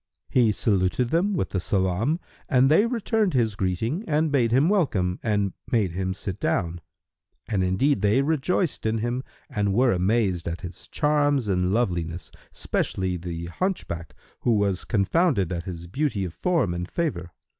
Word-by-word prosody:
He 120 -4 +4
saluted 105 +3 +1
them 190 +5 +2
with - - -1
the 95 - 0
salam, 95 - 0 0.3
and 130 0 +4
they 205 +9 +5
returned 220 - 0
his 115 -4 +2
greeting 110 - -1
and 155 0 +1
bade 120 -5 +2
him 135 +6 +4
welcome 105 - +1
and 100 -4 0 0.2
made 105 -7 +2
him 95 +1 -2
sit 95 0 -5
down; 85 -2 -1 0.7
and 100 -4 0
indeed 95 +11 +2
they 110 +6 +3
rejoiced 160 - 0
in 110 +1 +1
him 120 +3 -2 0.2
and 100 -2 -1
were 125 +1 +4
amazed 95 -2 +1
at 85 +1 -4
his 90 -1 -8
charms 145 -4 +1
and 90 -1 +1
loveliness, 85 -6 -1 0.2
especially 95 -1 -1
the 85 -1 -5
hunchback 85 - -3 0.2
who 120 - +2
was 100 -3 0
confounded 110 - +2
at 85 -1 -3
his 85 -3 -6
beauty 110 - -1
of 85 - -6
form 165 - +1
and 90 +1 -4
favour. 110 - -2
105 Hz, 160 wpm, -25 LUFS, 90-145 Hz, 0.7 s, they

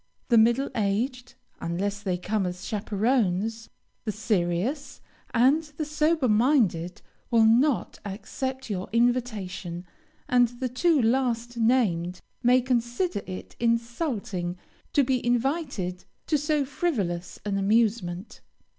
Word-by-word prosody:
The 235 - +5
middle 235 +5 +3
aged, 240 +4 -1 0.2
(unless 200 +4 -2
they 185 -3 -1
come 195 +1 -1
as 180 +1 -6
chaperons,) 220 0 0 0.3
the 220 - -1
serious, 210 - -1 0.3
and 260 +6 +4 0.2
the 310 - -1
sober 305 -1 +1
minded, 210 - +2 0.3
will 230 -2 +5
not 245 +5 +3
accept 260 +6 -5
your 190 -4 -4
invitation, 220 -7 -1 0.4
and 245 -1 +4
the 260 -1 -1
two 310 +5 +2
last 240 -1 +1
named 195 -7 +1 0.2
may 250 +1 +5
consider 240 - 0
it 185 -1 -7
insulting 230 - -1 0.4
to 285 - +5
be 255 -1 0
invited 245 - -1 0.2
to 310 - +1
so 295 -1 +1
frivolous 205 - -2
an 200 -1 0
amusement. 205 -3 0
230 Hz, 115 wpm, -26 LUFS, 195-255 Hz, 0.4 s, The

